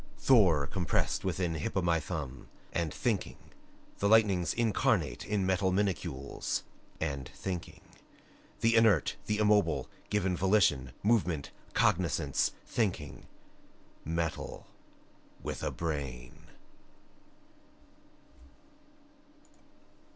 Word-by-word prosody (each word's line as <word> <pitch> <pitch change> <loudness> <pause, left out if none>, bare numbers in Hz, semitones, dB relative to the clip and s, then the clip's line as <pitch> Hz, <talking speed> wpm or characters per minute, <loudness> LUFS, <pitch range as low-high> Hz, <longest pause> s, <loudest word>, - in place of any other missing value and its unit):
Thor 90 - +5
compressed 90 +4 -1
within 90 -2 -1
Hop 80 +4 -3
o' - - +3
my 85 -1 +3
thumb 75 -5 -6 0.3
and 85 -3 -1
thinking. 115 -7 -1 0.6
The 100 - +2
lightnings 100 -6 +4
incarnate 115 -4 +1
in 100 -2 0
metal 95 0 +2
minacules 90 -8 -2 0.4
and 70 -5 -3
thinking. 90 -3 -5 0.8
The 115 +1 +4
inert, 110 -8 +4
the 105 - +1
immobile, 105 -1 +3 0.2
given 95 -3 +1
volition, 90 - +2
movement, 95 -9 +1 0.2
cognoscence 85 -1 +2
thinking. 80 - -2 0.8
Metal 80 0 -3 0.8
with - - -4
a - - -1
brain! 70 -7 -5
90 Hz, 90 wpm, -31 LUFS, 80-105 Hz, 0.8 s, Thor